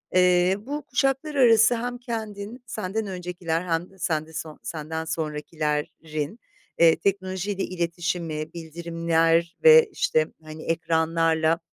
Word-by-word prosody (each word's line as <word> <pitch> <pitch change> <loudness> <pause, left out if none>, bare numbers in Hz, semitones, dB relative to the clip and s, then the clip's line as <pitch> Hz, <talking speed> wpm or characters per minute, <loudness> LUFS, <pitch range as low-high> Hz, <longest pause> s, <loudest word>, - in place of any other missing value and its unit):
Eee, 180 0 +4
bu 285 +6 -5
kuşaklar 270 +3 0
arası 230 -3 +6
hem 245 +1 -3
kendin, 225 -1 -6
senden 215 0 -3
öncekiler 180 -3 -3
hem 175 0 -2
de 190 - -20
sende 160 -2 -2
so 160 -1 -6
senden 160 0 -4
sonrakilerrin, 155 +2 -3 0.4
eee, 165 -1 +7
teknolojiyle 195 0 -2
iletişimi, 170 -3 -3
bildirimler 165 0 0
ve 475 -1 +8
işte 155 - +1 0.2
hani 155 0 -9
ekranlarla 165 0 +1
170 Hz, 115 wpm, -25 LUFS, 160-210 Hz, 0.4 s, ve